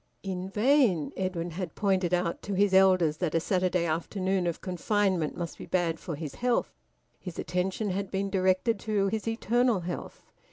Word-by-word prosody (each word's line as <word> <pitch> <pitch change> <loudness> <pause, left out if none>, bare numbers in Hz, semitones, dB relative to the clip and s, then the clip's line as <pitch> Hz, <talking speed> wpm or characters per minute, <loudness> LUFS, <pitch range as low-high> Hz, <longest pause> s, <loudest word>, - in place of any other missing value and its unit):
In 190 -1 -4
vain 215 - +3
Edwin 180 -2 -2
had 175 -1 -5
pointed 190 -3 +1
out 175 -1 0
to 200 - -4
his 200 0 +3
elders 185 -5 +5
that 165 -2 -1
a - - +4
Saturday 180 0 +1
afternoon 185 +3 -1
of 170 - -2
confinement 185 -2 0
must 170 -1 -5
be - - -8
bad 170 -3 0
for 165 - -5
his 150 -1 -6
health. 245 -1 0 0.5
His 180 -3 -8
attention 190 +3 -1
had 195 +1 -2
been 195 0 -2
directed 190 +3 +2
to 205 -3 0
his 220 +1 -3
eternal 230 -1 +1
health. 175 +1 -6
185 Hz, 170 wpm, -28 LUFS, 175-200 Hz, 0.5 s, elders